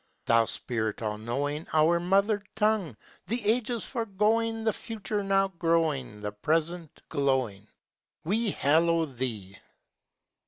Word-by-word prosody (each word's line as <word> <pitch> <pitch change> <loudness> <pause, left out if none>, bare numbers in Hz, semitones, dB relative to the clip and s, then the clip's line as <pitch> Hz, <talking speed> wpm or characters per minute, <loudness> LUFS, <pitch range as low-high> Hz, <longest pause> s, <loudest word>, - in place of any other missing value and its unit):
Thou 115 0 +4
spirit 110 -2 -2
all 105 -1 -2
knowing, 145 +7 -3
Our 160 +2 +4
mother 200 +4 +2
tongue, 210 - +1 0.3
The 235 +3 0
ages 230 +1 +1
foregoing, 225 0 0
The 220 -1 +2
future 210 -2 -4
now 195 0 +2
growing, 160 - 0
The 105 0 -3
present 160 - -2
glowing, 130 -9 0 0.6
We 215 +6 +1
hallow 165 +1 +3
thee! 120 -8 -5
165 Hz, 115 wpm, -28 LUFS, 130-210 Hz, 0.6 s, Thou